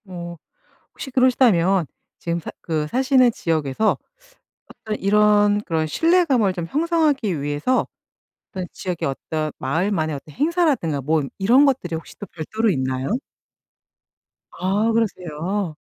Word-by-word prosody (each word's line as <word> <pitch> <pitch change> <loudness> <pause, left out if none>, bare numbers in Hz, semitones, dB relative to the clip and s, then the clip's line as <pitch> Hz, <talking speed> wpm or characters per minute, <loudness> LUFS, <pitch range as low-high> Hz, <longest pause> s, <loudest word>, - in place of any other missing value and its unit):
어 175 -2 -7 0.6
혹시 270 - -8
그러시다면 220 -9 +3 0.3
지금 170 0 -2
사 160 - -7
그 155 -3 -1
사시는 255 - +3
지역에서 160 +2 0 0.7
어떤 215 -1 -6
이런 205 0 +4
그런 160 -4 -1
신뢰감을 280 - +2
좀 175 -2 -4
형성하기 295 - +1
위해서 145 - 0 0.6
어떤 185 -1 -4
지역의 180 -3 -3
어떤 155 +3 -3
마을만의 160 +2 -1
어떤 145 +2 -10
행사라든가 285 - +1
뭐 155 +2 +1 0.2
이런 240 +9 +5
것들이 250 - 0
혹시 160 - -12
또 - - -6
별도로 215 +8 -2
있나요? 130 -3 -2 1.5
아 200 +5 +1
그러세요? 185 -4 -2
190 Hz, 285 characters per minute, -22 LUFS, 160-245 Hz, 1.5 s, 이런